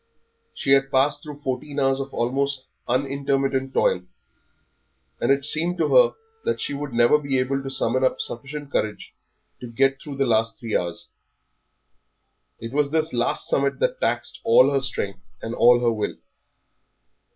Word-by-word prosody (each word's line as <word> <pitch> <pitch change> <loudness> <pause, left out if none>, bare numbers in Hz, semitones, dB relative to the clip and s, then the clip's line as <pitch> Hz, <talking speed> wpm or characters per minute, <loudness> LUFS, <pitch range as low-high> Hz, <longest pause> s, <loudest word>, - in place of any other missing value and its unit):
She 135 - -1
had 135 0 +4
passed 145 +2 +2
through 145 -1 -10
fourteen 140 +2 -3
hours 135 0 +2
of 135 0 -5
almost 135 +2 -1 0.2
unintermittent 135 +1 0
toil, 90 - +2 1.2
and 120 - +2
it 140 0 +2
seemed 170 +4 +1
to 170 - +1
her - - +6 0.3
that 465 - -1
she - - -2
would 145 0 -5
never 120 +5 +4
be 140 -2 -1
able 135 +2 0
to 135 - -6
summon 130 -1 0
up 130 - +1
sufficient 140 +4 -4
courage 105 -5 -3 0.5
to 125 - -8
get 135 +3 +1
through 145 -4 -8
the 135 - +2
last 115 -1 +1
three 115 -2 -3
hours. 85 -1 -2 1.5
It 115 +2 -7
was 145 0 +1
this 160 0 -1
last 120 -1 -1
summit 140 0 0
that - - -1
taxed - - -1
all 140 - +5
her 140 - +2
strength 110 -7 -2 0.2
and 115 - -5
all 120 0 +5
her 120 -1 +3
will. 105 -2 -3
135 Hz, 160 wpm, -23 LUFS, 125-145 Hz, 1.5 s, her